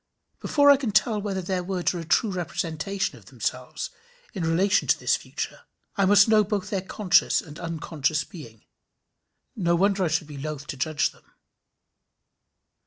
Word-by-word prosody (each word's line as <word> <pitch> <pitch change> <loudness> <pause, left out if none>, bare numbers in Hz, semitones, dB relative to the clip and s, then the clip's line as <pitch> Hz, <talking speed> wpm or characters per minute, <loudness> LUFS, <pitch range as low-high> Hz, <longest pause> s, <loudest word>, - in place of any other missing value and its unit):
Before 285 -1 +5
I 280 - +6
can 265 -4 -2
tell 215 +1 +2
whether 195 -2 -3
their 180 0 -2
words 180 -1 -1
are 175 - -4
a - - -5
true 205 +6 +2
representation 180 +1 -3
of - - -22
themselves, - - -4 0.4
in 195 - -4
relation 180 +5 +2
to - - +4
this - - +2
future, - - -6 0.3
I 200 - +2
must 200 +1 +6
know 215 -1 +5
both 205 -1 -3
their 195 -2 0
conscious 190 0 +2
and 155 -1 -10
unconscious 160 -3 -1
being. 120 - -12 0.9
No 170 -5 +1
wonder 195 +2 +2
I - - +2
should 155 0 0
be 145 -2 -9
loath 150 -1 -5
to 145 - -6
judge 145 +2 0
them. - - -25
180 Hz, 170 wpm, -25 LUFS, 160-200 Hz, 0.9 s, I